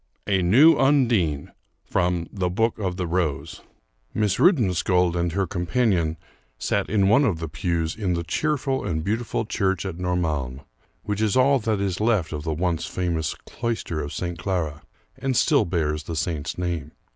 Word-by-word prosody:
A 95 -2 +2
NEW 130 - +6
UNDINE 115 - +2 0.3
From 90 -1 0
'The 95 -3 -1
Book 110 +5 0
of 95 -3 -2
the 90 - -1
Rose' 85 -4 -2 0.5
Miss 105 -3 +1
Rudensköld 90 - +3
and 85 0 0
her 95 +1 +1
companion 90 -3 0 0.4
sat - - -1
in 100 -2 +3
one 115 +8 +5
of 105 -11 +1
the 80 0 -4
pews 80 +2 -2
in 95 -5 -1
the 85 - -2
cheerful 135 - -1
and 80 -2 -2
beautiful 115 +3 -1
church 95 -3 -1
of 90 -3 -4
Normalm, 80 -8 -1 0.4
which 105 0 -2
is 110 +1 +2
all 135 +1 +4
that 110 -2 -1
is 100 -1 -2
left 105 -9 +1
of 75 - -3
the 80 +1 -3
once 85 0 -1
famous 85 -4 -2
cloister 115 -9 -3
of 70 0 -5
St. 85 +1 -4
Clara, 85 -5 -2 0.4
and 135 -2 0
still - - +4
bears 80 -3 -1
the 80 +2 -6
saint's 80 -2 -2
name. 85 -4 -3
90 Hz, 170 wpm, -24 LUFS, 80-110 Hz, 0.5 s, NEW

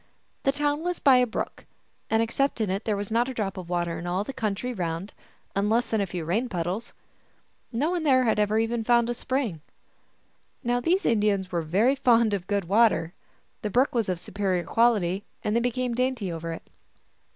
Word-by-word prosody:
The 275 - +5
town 290 +1 0
was 355 0 -1
by 270 -3 +5
a 250 0 +3
brook, 220 - -5 0.4
and 225 0 +3
except 275 +4 0
in 210 -4 0
it 195 +3 -3
there 210 -2 0
was 205 +1 -5
not 240 +3 +2
a 260 - -6
drop 200 -4 -2
of 180 -3 -8
water 175 -2 -1
in 175 - -6
all 180 +3 0
the 270 - -6
country 220 +2 -2
round, 175 -1 -4 0.4
unless 220 +5 +1
in 220 - +2
a 200 - -1
few 175 -3 -5
rain 220 +10 0
puddles. 180 +5 -3 0.8
No 280 +8 0
one 355 -2 -1
there 265 -4 +4
had 220 -3 +2
ever 210 0 +2
found 225 +1 0 0.2
even - - -4
a - - +1
spring. 240 - -2 1.0
Now 245 0 +1
these 355 +10 +1
Indians 205 -4 +1
were 170 -1 0
very 195 - +2
fond 235 -5 +3
of 190 -3 -3
good 200 -1 0
water. 195 -4 +3 0.5
The 210 - -2
brook 255 +6 +2
was 230 -5 0
of 180 - 0
a - - -13
superior 185 -2 -1
quality, 205 -5 +2 0.2
and 210 - 0
they - - +4
be 245 +1 +1
came 250 0 -2
dainty 250 -6 -1
over 165 0 -4
it. 165 - -7
220 Hz, 205 wpm, -26 LUFS, 190-245 Hz, 1.0 s, The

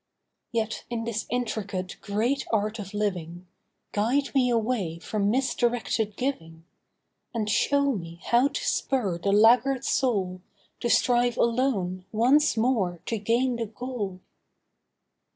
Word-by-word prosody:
Yet 225 -2 -2
in 235 -1 -3
this 225 -1 -3
intricate 205 -6 -3
great 230 +7 -1
art 215 0 0
of 195 -2 -6
living 180 -4 -3 0.5
Guide 250 +7 0
me 260 -3 +3
away 225 -8 0
from 200 +3 -1
misdirected 240 -3 0
giving, 165 -12 -4 0.7
And 215 -2 -1
show 280 +6 +2
me 170 -7 -6
how 240 +3 +4
to - - -4
spur 205 -11 0
the 200 +3 0
laggard 240 +5 +4
soul 190 -8 0 0.4
To 240 - -1
strive 245 -1 +3
alone 220 -7 0
once 260 +6 +3
more 220 -7 +1
to 225 - -2
gain 235 +4 +1
the 230 -1 -3
goal. 210 -4 -5
225 Hz, 125 wpm, -26 LUFS, 200-250 Hz, 0.7 s, how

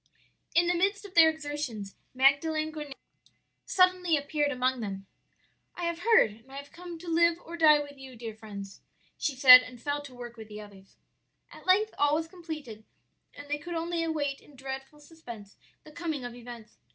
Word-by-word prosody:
"In 340 +1 +5
the 350 - +2
midst 395 +4 0
of 390 - -11
their 330 -2 +7
exertions 290 -10 -5 0.2
Magdalen 310 +4 +3
Goneto 295 -3 -7 0.7
suddenly 365 -3 +3
appeared 290 0 -1
among 255 -1 0
them. 195 -3 -5 0.7
"'I 350 - -6
have 340 0 -2
heard, 450 - +4
and 230 +5 -18
I 275 +1 -7
come 340 +4 -10
to 350 +2 -12
live 340 0 +3
or 340 - -7
die 310 -3 +6
with 285 -1 -10
you, 265 -1 -11
dear 225 -1 -7
friends,' 200 -3 -10 0.3
she 285 - -2
said, 255 -1 +10
and 250 -1 -11
fell 290 +3 -2
to 275 -3 -12
work 240 -1 -9
with 220 -1 -10
the 210 0 -9
others. 200 -2 -14 0.6
"At - - -14
length 420 +4 +3
all 290 +1 +4
was 320 +1 -2
completed, 310 - -8 0.5
and 290 0 -10
they 295 +1 -2
could 345 +3 -6
only 335 +1 -2
await 290 -4 -2
in 295 - -19
dreadful 270 +2 -7
suspense 240 -10 -12 0.3
the 305 - -14
coming 310 -5 -4
of 245 - -6
events. 240 -2 -11
290 Hz, 185 wpm, -29 LUFS, 245-330 Hz, 0.7 s, said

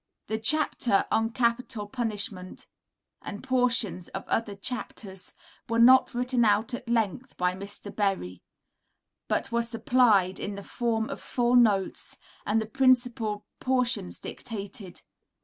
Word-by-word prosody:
The 220 0 -2
chapter 235 -4 +3
"On 225 0 +2
Capital 235 -2 -1
Punishment," 205 -5 -3 0.6
and 205 - -7
portions 245 -8 +1
of 195 - -7
other 215 -3 -1
chapters, 195 -3 -5 0.4
were 230 - 0
not 255 +2 +6
written 250 0 +2
out 215 +2 +2
at 245 0 -6
length 235 +2 -1
by 180 0 +1
Mr. 200 +2 -7
Berry, 190 - -1 0.9
but - - -1
were 235 0 +2
supplied 230 -5 +2
in 200 - -4
the 200 - -8
form 225 -1 -1
of - - -6
full 245 -1 0
notes, 210 -6 +2 0.3
and 215 +2 +2
the 220 - -2
principal 240 -4 +1
portions 250 - 0
dictated. 205 -4 -7
225 Hz, 130 wpm, -27 LUFS, 200-245 Hz, 0.9 s, not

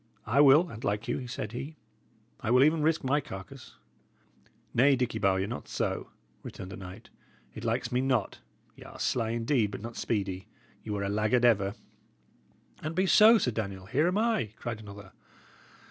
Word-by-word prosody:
"I 130 +7 +3
will, 145 +5 +6
an't 115 +1 -9
like 105 +2 -1
you," 125 - -3
said 110 -4 -5
he. 140 +6 -6 0.6
"I - - -4
will 125 +2 +6
even 155 +2 +3
risk 160 +1 +1
my 140 +3 +1
carcase." 95 -7 -10 1.0
"Nay, 135 +3 +5
Dicky 125 -3 -2
Bowyer, 95 -2 +2
not 115 +4 -6
so," - - -3 0.3
returned 95 - -9
the - - -6
knight. 95 +2 -11 0.4
"It - - -9
likes 120 - -1
me 125 +1 +1
not. 130 -6 0 0.4
Y' - - -17
are - - -11
sly 115 -3 0
indeed, 115 -1 +1
but 100 - -7
not 115 +1 -7
speedy. 95 -4 -3 0.4
Ye 110 - -6
were 100 -1 -2
a 100 - -1
laggard 110 +4 +2
ever." 100 -4 +3 1.1
"An't 155 +2 -4
be 185 +2 +2
so, 215 +4 +7
Sir 125 - 0
Daniel, 100 -4 -5
here 135 - +1
am 180 +3 0
I," 215 - 0
cried 115 -2 -5
another. 100 -2 -11
115 Hz, 175 wpm, -29 LUFS, 105-140 Hz, 1.1 s, so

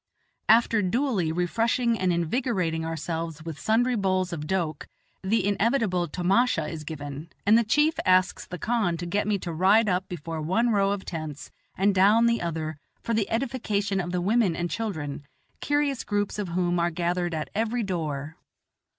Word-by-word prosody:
After 225 -1 +5
duly 205 - 0
refreshing 230 +8 +1
and 185 -1 +2
invigorating 170 -2 0
ourselves 165 0 -4
with 160 -3 -6
sundry 240 +3 +2
bowls 185 -3 0
of 150 -2 -5
doke, 165 -5 -2 0.3
the 195 +1 +1
inevitable 205 -3 +1
tomasha 185 0 +1
is 155 -1 -6
given, 145 0 -7 0.2
and 210 +2 +6
the 235 - +5
chief 300 +8 +2
asks 185 -1 +2
the 180 - -6
khan 210 -4 0
to 175 - -5
get 200 +4 -1
me 210 -1 +2
to 175 -3 -5
ride 195 +7 +4
up 185 0 0
before 165 -2 -5
one 190 +10 +1
row 200 -2 +3
of 200 -1 -2
tents 155 -3 -6 0.3
and 195 +2 +3
down 205 +5 +5
the 235 0 +2
other 160 -2 -3 0.3
for 230 - -1
the 215 -2 0
edification 225 -5 -1
of 175 -1 -3
the 180 0 -1
women 200 -2 +2
and 175 0 -3
children, 155 -11 -4 0.4
curious 290 -2 0
groups 205 0 -2
of 205 - -2
whom 175 0 0
are 170 0 +2
gathered 175 0 -1
at 155 - -4
every 230 +3 0
door. 155 -6 -3
185 Hz, 170 wpm, -26 LUFS, 165-225 Hz, 0.4 s, and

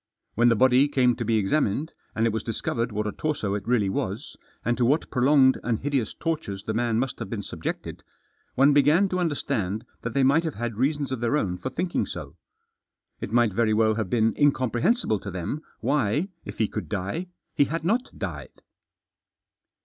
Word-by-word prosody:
When 120 +2 +4
the 115 - +4
body 130 +3 +5
came 125 -4 +2
to 120 - -2
be 115 0 +1
examined, 125 +7 0 0.2
and 115 - +1
it 115 - +2
was 110 - -1
discovered 115 +1 -2
what 105 0 -2
a 105 - -1
torso 140 -10 -2
it 100 -1 -4
really 120 -5 +2
was, 95 - -3 0.3
and 120 - +2
to - - +3
what 140 +7 +1
prolonged 130 +1 +4
and 115 -2 0
hideous 135 -3 -1
tortures 155 - -3
the 110 - -3
man 115 0 +1
must 130 +2 -2
have 115 -4 -5
been 105 -2 -4
subjected, - - -5 0.5
one 140 +2 +5
began 155 +7 +4
to 185 - -1
understand 110 - -1 0.2
that 115 -1 -5
they 140 - +3
might 140 +5 +4
have 160 -3 -3
had 120 0 -3
reasons 140 +3 0
of 130 - -2
their 120 +5 +1
own 95 -10 -1
for 130 - -3
thinking 170 +7 -1
so. - - -7 0.8
It - - -5
might 120 -4 +3
very 110 0 +2
well 110 0 +3
have 110 -4 -2
been 115 0 +2
incomprehensible 135 - +2
to 100 - -7
them 95 - -4 0.2
why, 140 - +1 0.2
if - - -8
he 110 - +2
could 100 -8 -5
die, 105 - -3 0.3
he 145 - +3
hadn't 170 - -1
died. - - -7
120 Hz, 190 wpm, -25 LUFS, 110-145 Hz, 0.8 s, body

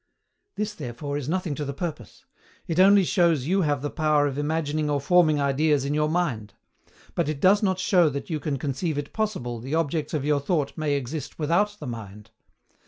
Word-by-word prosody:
This 210 0 -2
therefore 140 - -5
is 145 -1 -3
nothing 180 -3 -1
to 150 - -4
the 140 -1 -5
purpose; 155 - -6 0.4
it 165 +1 -1
only 195 +1 +7
shows 170 -7 +2
you 190 +5 +2
have 145 -4 0
the 145 - -2
power 155 -2 +2
of 140 -2 -2
imagining 150 0 -1
or 145 -1 +1
forming 155 0 +3
ideas 140 0 +2
in 140 - -1
your 150 0 +1
mind: 130 - -2 0.6
but - - 0
it 150 -2 -3
does 195 +6 +5
not 190 -3 +1
show 180 -3 +3
that 140 -1 -5
you 160 -3 -2
can 145 -2 -2
conceive 145 +4 -2
it 145 0 -5
possible 185 - -2
the 135 +7 -3
objects 160 -1 -1
of 145 -2 -2
your 150 -1 +2
thought 145 -1 -1
may 155 -3 0
exist 140 +1 -5
without 190 +7 +1
the - - -7
mind. 105 -3 -8
150 Hz, 200 wpm, -25 LUFS, 140-170 Hz, 0.6 s, only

